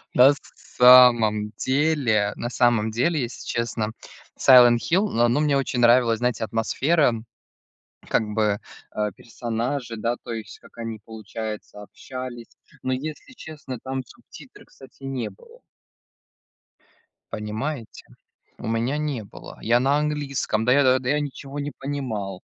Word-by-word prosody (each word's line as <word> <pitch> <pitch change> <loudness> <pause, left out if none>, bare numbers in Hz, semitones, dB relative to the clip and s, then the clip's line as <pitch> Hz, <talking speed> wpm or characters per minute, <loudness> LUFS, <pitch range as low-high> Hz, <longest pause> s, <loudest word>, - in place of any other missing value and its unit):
Нас 135 +3 +6 0.2
самом 120 -4 +5
деле 130 -8 +1
на 120 - -4
самом 120 -3 +2
деле, 140 +7 +1
если 120 -1 -6
честно, 115 -2 -2 0.4
"Сайлент 120 -2 +7
Хилл", 190 - +1
но 120 -6 +2
оно 120 +5 +2
мне 150 -2 +2
очень 130 -2 -2
нравилась, 120 -1 +4
знаете, 125 -2 -1
атмосфера, 125 +6 +1 1.0
как - - +2
бы, 105 -2 +1 0.4
э, 105 -1 -1
персонажи, 120 +2 -4
да, 115 +3 -1
то - - -7
есть, 110 -2 -7
как - - -20
они, 115 -2 -5
получается, 110 -1 -7
общались, 125 +2 -9 0.3
но, 130 - 0
если 150 - -6
честно, 150 -6 -8
там 130 0 -3
субтитры, - - -15
кстати, 135 0 -17
не 135 -2 -3
было. 475 0 -18 1.7
Понимаете? 110 +4 -5 0.5
У - - -8
меня 115 +6 -1
не 150 -6 -2
было. 100 - -12
Я 120 +2 +3
на 140 +3 +2
английском. 145 -7 -1
Да 125 - +3
я 130 -2 +4
да 130 -1 -5
я 150 +2 +2
ничего 140 0 -6
не 145 +1 -3
понимал, 110 -9 -4
125 Hz, 135 wpm, -24 LUFS, 115-140 Hz, 1.7 s, Сайлент